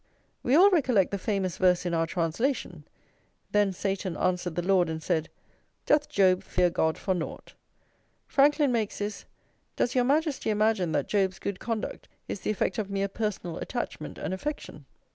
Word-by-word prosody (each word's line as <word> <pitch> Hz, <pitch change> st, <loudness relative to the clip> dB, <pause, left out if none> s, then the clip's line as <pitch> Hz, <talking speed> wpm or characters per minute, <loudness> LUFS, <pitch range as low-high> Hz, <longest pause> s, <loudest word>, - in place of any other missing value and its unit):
We 255 Hz, -, +2 dB
all 385 Hz, +5 st, +7 dB
recollect 250 Hz, -, +3 dB
the 200 Hz, -, -2 dB
famous 190 Hz, -3 st, -1 dB
verse 180 Hz, -1 st, +3 dB
in 175 Hz, -, -1 dB
our 165 Hz, 0 st, +1 dB
translation: 180 Hz, -, -2 dB, 0.7 s
"Then 205 Hz, -1 st, +3 dB
Satan 190 Hz, -1 st, -3 dB
answered 180 Hz, -2 st, -1 dB
the 175 Hz, -, -1 dB
Lord 185 Hz, -3 st, +3 dB
and 160 Hz, 0 st, -4 dB
said: 160 Hz, -2 st, 0 dB, 0.6 s
'Doth 295 Hz, 0 st, +3 dB
Job 185 Hz, -2 st, +3 dB
fear 180 Hz, -1 st, +1 dB
God 160 Hz, -1 st, +1 dB
for 190 Hz, -, -1 dB
nought?'" 175 Hz, -3 st, -6 dB, 0.7 s
Franklin 290 Hz, 0 st, +3 dB
makes 225 Hz, -4 st, -1 dB
this: 205 Hz, 0 st, -4 dB, 0.5 s
"Does 245 Hz, -, 0 dB
Your 250 Hz, -, +3 dB
Majesty 290 Hz, -2 st, +1 dB
imagine 210 Hz, -5 st, +2 dB
that -, -, 0 dB
Job's 190 Hz, -2 st, +1 dB
good 200 Hz, -2 st, -4 dB
conduct 225 Hz, -2 st, -4 dB, 0.2 s
is -, -, -4 dB
the -, -, -4 dB
effect 205 Hz, -1 st, 0 dB
of 205 Hz, -2 st, -3 dB
mere 195 Hz, 0 st, 0 dB
personal 200 Hz, -5 st, -3 dB
attachment 240 Hz, -10 st, -5 dB
and 185 Hz, -, -3 dB
affection?" 190 Hz, -, -5 dB
195 Hz, 165 wpm, -28 LUFS, 180-230 Hz, 0.7 s, all